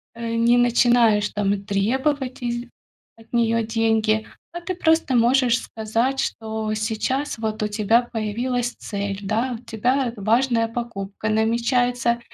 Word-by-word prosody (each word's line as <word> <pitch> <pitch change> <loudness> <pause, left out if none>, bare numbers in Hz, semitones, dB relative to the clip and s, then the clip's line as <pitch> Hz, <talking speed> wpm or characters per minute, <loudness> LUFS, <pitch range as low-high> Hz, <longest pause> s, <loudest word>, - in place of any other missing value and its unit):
э, 230 0 -4
не 235 +1 +4
начинаешь 235 -3 +4
там 200 -1 -1
требовать 260 +7 -1
из 240 0 -3 0.5
от 225 +1 -20
неё 230 -1 +2
деньги, 220 -1 +1 0.3
а 345 - -6
ты 370 +2 -3
просто 320 -5 +2
можешь 245 +1 +3
сказать, 230 +5 -2
что 220 -1 -3
сейчас 225 +7 -2
вот 220 -1 -3
у - - +1
тебя 215 +2 +2
появилась 240 +2 -2
цель, 200 -1 -4
да, 225 +5 -1
у - - -26
тебя, 245 +4 0
э, 230 - -4
важная 230 +3 +2
покупка 220 -3 -5
намечается 235 +2 +1
230 Hz, 135 wpm, -22 LUFS, 220-245 Hz, 0.5 s, не